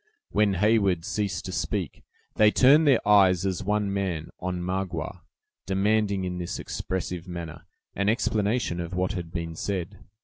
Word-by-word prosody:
When 105 -2 +2
Heyward 100 -3 +2
ceased 100 -3 -2
to 95 - -4
speak, - - -3 0.3
they 105 -1 +5
turned 145 +7 +5
their 130 -7 +3
eyes, 95 -3 +5
as 95 -1 -1
one 105 0 0
man, 90 -5 -2
on 90 0 -3
Magua, 95 +1 -3 0.5
demanding, 100 0 +1
in 90 -1 -3
this 85 - -4
expressive 90 -1 -4
manner, 85 -2 -7 0.3
an 100 +1 0
explanation 110 -4 0
of 85 +1 -4
what 90 +1 0
had 85 -4 -5
been 85 -1 -4
said. 95 +1 -4
95 Hz, 150 wpm, -26 LUFS, 90-105 Hz, 0.5 s, they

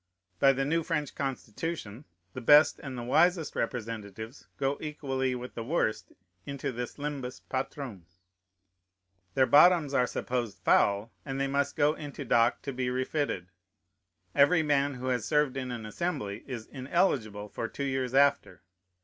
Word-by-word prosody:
By 135 - +6
the 135 0 -1
new 165 +4 +1
French 155 -3 -2
Constitution 135 -1 -4 0.3
the 130 - -6
best 150 +5 +6
and 135 -3 -7
the 120 - -4
wisest 170 +6 +2
representatives 110 0 -5
go 135 +1 -1
equally 135 -4 -2
with 125 0 -7
the 115 - -5
worst 125 -4 -1 0.3
into 140 +2 -4
this 120 0 -5
Limbus 140 -3 -5
Patrum. 130 - -4 1.3
Their 130 - +5
bottoms 150 0 +6
are 125 -2 +3
supposed 120 -7 -3
foul, 100 +4 +3
and 135 0 -4
they 135 - +1
must 140 +1 0
go 150 0 +3
into 145 -3 -7
dock 115 +1 +3
to 140 - -4
be 125 0 -1
refitted. 130 - -2 0.8
Every 160 +4 +5
man 145 -2 +1
who 125 +1 -7
has 125 -3 0
served 150 -3 +1
in 130 -2 -3
an 120 -3 -5
Assembly 110 - -3
is 120 -5 -5
ineligible 130 - -1
for 115 - -4
two 140 - -5
years 130 -2 -1
after. 140 -8 +2
135 Hz, 150 wpm, -29 LUFS, 120-145 Hz, 1.3 s, By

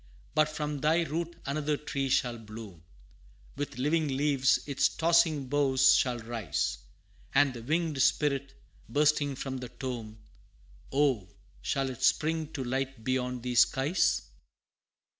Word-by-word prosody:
But 155 0 +3
from 150 -1 -3
thy 160 +4 +3
root 170 +2 -3
another 145 +1 -1
tree 140 -2 -3
shall 120 -2 +1
bloom 105 -5 -10 0.7
With 145 -3 -5
living 155 +4 +1
leaves 135 -1 +2
its 140 -2 +2
tossing 160 -4 +2
boughs 135 -1 +4
shall 125 -2 +2
rise; 115 -1 -2 0.6
And 140 -1 +4
the 120 - -8
winged 155 +2 0
spirit 140 -2 +1 0.3
bursting 145 -1 +2
from 130 0 -4
the 125 -1 -7
tomb, 115 -5 -6 0.7
Oh, 135 -9 +1 0.3
shall 135 -1 -1
it 125 - -10
spring 160 0 +1
to 135 - -3
light 130 -1 -3
beyond 125 0 -1
these 125 -1 +1
skies? 140 +9 +3
135 Hz, 130 wpm, -29 LUFS, 125-150 Hz, 0.7 s, boughs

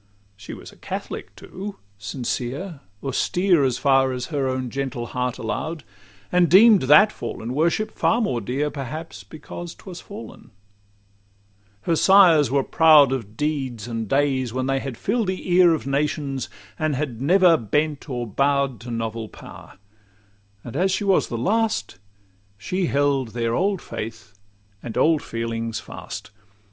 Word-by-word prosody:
She 105 +1 -9
was - - -11
a - - -19
Catholic, - - -6
too, 200 +2 -8 0.2
sincere, 130 - -4 0.2
austere, 175 +4 +2
As 130 -2 +1
far 135 -1 +3
as 125 -1 -4
her 140 -2 0
own 130 -2 -2
gentle 135 -3 -3
heart 125 0 -3
allow'd, 155 +7 -4 0.5
And 180 -2 +3
deem'd 205 +2 +7
that 210 +10 +7
fallen 115 - -6
worship 170 +9 +1
far 230 - +1
more 130 - -1
dear 140 +7 -2
Perhaps 155 +4 -7
because 165 +2 -9
'twas 180 -3 -10
fallen: 205 - -11 1.3
her 165 - +1
sires 170 - +6
were 135 +1 +1
proud 155 -4 +6
Of 115 -5 -4
deeds 135 -7 -2
and 115 -2 -4
days 135 -3 +1
when 130 +2 -2
they 135 0 0
had 135 -3 -6
fill'd 220 0 -1
the 185 -1 -3
ear 180 -1 +6
Of 155 - -7
nations, 140 -1 -2 0.3
and 155 -2 0
had 130 -4 -4
never 180 +3 +5
bent 150 +4 -1
or 120 -2 -3
bow'd 140 +2 0
To 120 - -9
novel 115 -1 -4
power; - - -13 0.9
and 120 - -9
as 185 +5 +2
she 195 - -1
was 195 -2 +2
the 120 - -4
last, 195 - 0 0.6
She 180 - -2
held 140 -5 0
their 115 -1 0
old 195 +5 0
faith 110 -1 -7 0.5
and 115 - -6
old 160 -2 +3
feelings 115 -1 -4
fast. - - -9
140 Hz, 150 wpm, -23 LUFS, 120-170 Hz, 1.3 s, deem'd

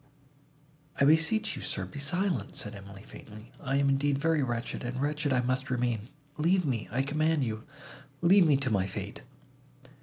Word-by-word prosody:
"I 140 - +5
beseech 165 +9 +3
you, - - -7
sir, - - -2
be 145 - -8
silent," 180 +4 -1
said 115 -7 -2
Emily 100 0 -11
faintly: 110 +3 -12
"I 135 +1 -2
am 140 0 +3
indeed 140 +1 +2
very 160 +1 +1
wretched, 120 -2 -3
and 125 +1 -4
wretched 145 +1 -1
I 130 -1 +3
must 130 +1 -1
remain. 120 -3 -1 0.3
Leave 175 +3 +2
me—I 125 -1 -1
command 155 +1 +1
you, 110 -2 -4 0.6
leave 180 +1 +6
me 145 -3 +4
to 135 -2 -2
my 95 -3 +1
fate." - - -6
135 Hz, 170 wpm, -29 LUFS, 120-155 Hz, 0.6 s, leave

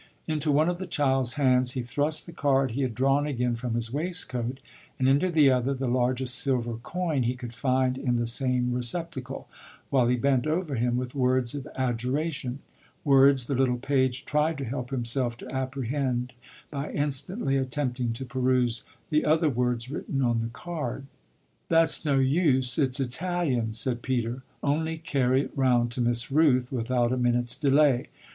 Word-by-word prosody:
Into 155 -1 -1
one 150 +3 +3
of 175 0 -1
the 185 - -5
child's 130 -4 +1
hands 125 -3 +3
he 130 - -3
thrust 145 +5 -1
the 170 - -10
card 135 -5 +1
he 130 +5 -2
had 125 -4 -2
drawn 135 +4 +2
again 125 -4 -1
from 115 0 -3
his 115 0 -3
waistcoat 135 -6 -2 0.4
and 130 - +1
into 140 +7 +3
the 150 -5 +5
other 130 +2 +1
the 135 0 -3
largest 125 +1 +2
silver 120 -4 -1
coin 165 -2 -2
he 125 +1 0
could 120 -2 -8
find 130 +1 0
in 125 -3 0
the 120 0 0
same 125 +1 +1
receptacle, 130 +1 -2 0.4
while 130 -3 +3
he 125 - +3
bent 130 +1 +1
over 160 -1 -1
him 120 0 0
with 125 0 -4
words 130 -2 +1
of 145 0 -6
adjuration 130 +2 -2 0.4
words 135 -2 +5
the 140 - -2
little 130 -1 +1
page 130 0 0
tried 150 +1 +1
to 140 - -4
help 125 +1 -4
himself 120 -1 -1
to - - -10
apprehend 130 -1 -2 0.4
by 140 0 -4
instantly 145 - -1
attempting 130 -2 -1
to 130 +3 -6
peruse 125 -2 +1 0.3
the 150 0 +2
other 155 +1 +3
words 125 0 -1
written 135 -2 -2
on 120 -2 +1
the 115 - -2
card. 135 -1 -5 0.6
"That's 165 0 +3
no 145 -3 +1
use 130 -2 +2
it's 135 -1 +2
Italian," 135 -4 -1
said 120 +2 0
Peter; 125 -1 -2 0.2
"only 160 +3 0
carry 135 -4 +1
it - - -8
round 125 -3 +2
to 125 - -2
Miss 120 +2 +1
Rooth 135 -5 +3
without 120 -1 0
a 130 - 0
minute's 120 -1 +1
delay. 140 -2 +3
130 Hz, 170 wpm, -27 LUFS, 125-145 Hz, 0.6 s, the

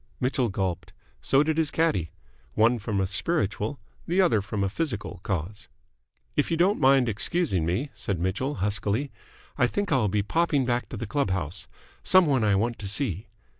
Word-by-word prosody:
Mitchell 125 -2 0
gulped. 95 -2 -3 0.3
So 135 +2 +3
did 160 +1 0
his 160 -2 +2
caddie. 100 - +1 0.5
One 115 +2 +4
from 105 -1 -2
a 95 - +2
spiritual, 105 - -1 0.3
the 175 +3 +1
other 170 - +4
from 105 0 -3
a - - +1
physical 105 - -3
cause. 95 +1 -4 0.7
"If - - +1
you 165 - 0
don't 185 +5 +3
mind 135 -1 +5
excusing 110 - 0
me," 120 - -1
said 100 - -3
Mitchell, 95 - -1
huskily, 105 +7 -1 0.5
"I 120 - +5
think 200 +7 -2
I'll 130 -7 +3
be 100 +1 0
popping 150 +2 +1
back 120 0 -1
to - - -6
the 115 - -4
club 140 +2 -1
house. 90 -1 -3 0.4
Someone 150 -10 +4
I 105 -2 +3
want 115 +4 0
to 100 - -5
see." 100 - -1
110 Hz, 175 wpm, -26 LUFS, 95-145 Hz, 0.7 s, mind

